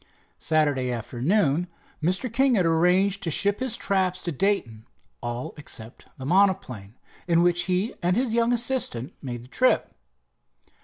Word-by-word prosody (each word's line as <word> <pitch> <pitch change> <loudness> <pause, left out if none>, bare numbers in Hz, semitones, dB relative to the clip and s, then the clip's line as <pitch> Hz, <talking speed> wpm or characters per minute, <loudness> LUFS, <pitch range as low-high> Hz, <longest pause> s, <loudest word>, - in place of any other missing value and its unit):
Saturday 145 -5 +1
afternoon 140 - 0 0.3
Mr. 185 +9 0
King 265 0 +3
had 185 -4 +2
arranged 180 +4 +2
to 170 - -2
ship 200 +6 +1
his 255 -3 -1
traps 190 -2 0
to 170 - -2
Dayton, 135 - -1 0.3
all 120 +1 -5
except 120 -6 -8
the 130 - -7
monoplane, 170 - +1 0.3
in 170 -1 +3
which 175 0 +2
he 185 +5 0
and 180 +1 +1
his 245 -2 +1
young 235 +1 +2
assistant 235 - 0
made 120 -4 -6
the - - -14
trip. 255 - +1
175 Hz, 145 wpm, -25 LUFS, 130-200 Hz, 0.3 s, King